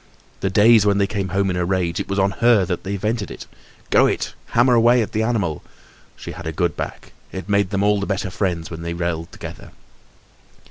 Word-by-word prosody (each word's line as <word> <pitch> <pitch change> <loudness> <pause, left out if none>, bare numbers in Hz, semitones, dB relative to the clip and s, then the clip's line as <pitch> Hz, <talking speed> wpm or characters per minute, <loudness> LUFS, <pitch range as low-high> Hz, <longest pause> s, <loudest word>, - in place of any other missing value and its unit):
The 95 - -1
days 110 +3 +6
when 100 -1 +2
they 100 - +3
came 100 -1 -3
home 95 +1 +1
in - - -2
a 90 - 0
rage, 90 -1 -1
it - - -3
was 100 - -2
on 100 0 +2
her 115 -5 +5
that 90 0 -3
they 100 +1 -3
vented 105 +1 -2
it. - - -9 0.5
Go - - +5
it! - - -2
hammer 120 +2 +3
away 120 +1 +5
at - - -7
the 110 - 0
animal! 105 -9 -1 0.5
She - - -8
had 85 +1 -8
a - - -1
good 85 0 -1
back; - - -6 0.2
it 95 0 -6
made 100 -2 +2
them 100 0 0
all 105 0 +3
the 100 - -3
better 100 -1 -2
friends 90 -4 -2
when 80 0 -6
they 85 0 -4
yelled 85 -1 -3
together. - - -9
100 Hz, 225 wpm, -21 LUFS, 90-105 Hz, 0.5 s, days